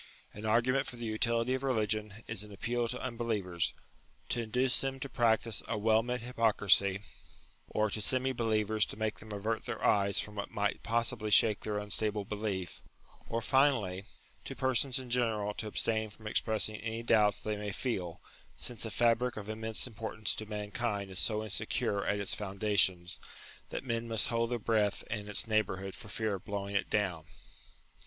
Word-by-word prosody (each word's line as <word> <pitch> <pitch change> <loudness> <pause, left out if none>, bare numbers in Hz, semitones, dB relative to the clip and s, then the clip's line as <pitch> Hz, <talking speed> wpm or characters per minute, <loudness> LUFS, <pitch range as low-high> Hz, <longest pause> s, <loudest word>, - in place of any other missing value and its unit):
An 105 +1 -6
argument 125 +5 +3
for - - -7
the 120 -1 -6
utility 115 +2 +1
of 130 - -1
religion 110 -4 -1
is 110 -3 -2
an 105 - -11
appeal 120 +4 -1
to 125 +2 -1
unbelievers, 110 -8 -1 0.5
to 120 - +1
induce 125 +3 +1
them 135 0 -2
to 140 - -4
practise 115 -3 +2
a 115 - -1
well 110 +1 +4
meant 125 +1 -3
hypocrisy, 105 -5 +3 0.7
or 110 0 +1
to 110 - -1
semi 130 +5 +3
believers 110 -2 +2
to - - -7
make 110 -1 -2
them 110 0 -10
avert 110 +2 -2
their 120 -3 -3
eyes 100 0 +4
from 105 - -3
what 100 -1 -4
might 105 0 -1
possibly 115 -2 -1
shake 105 0 +5
their 105 -1 -3
unstable 105 0 0
belief, 100 -4 -3 0.5
or 115 0 -1
finally 110 -8 +2 0.4
to 135 - -6
persons 130 0 +1
in 130 -2 -6
general 110 -4 +1
to 110 - -4
abstain 110 +1 +1
from 110 +1 -15
express 110 0 +1
ing 110 0 -6
any 115 +1 -4
doubts 105 -3 +4
they 105 0 -2
may 105 0 -4
feel, 95 -7 -3 0.4
since 120 -4 -1
a - - -3
fabric 120 +2 +2
of 105 -1 -6
im 110 +1 -5
mense 110 0 -1
importance 110 -3 -2
to 110 - -6
mankind 105 -1 -3
is 95 - +1
so 110 -1 +2
insecure 100 -1 -1
at 100 0 +1
its 100 - 0
foundations, 95 -3 +1 0.5
that - - -4
men 115 -2 -2
must 115 -2 0
hold 115 0 +1
their 120 - 0
breath 105 -2 +1
in 105 -2 -3
its 105 - +3
neighbourhood 95 -3 0
for - - -11
fear 110 +1 -1
of 95 - -5
blowing 100 0 -4
it 100 - 0
down. 90 -7 0
110 Hz, 180 wpm, -32 LUFS, 105-115 Hz, 0.7 s, shake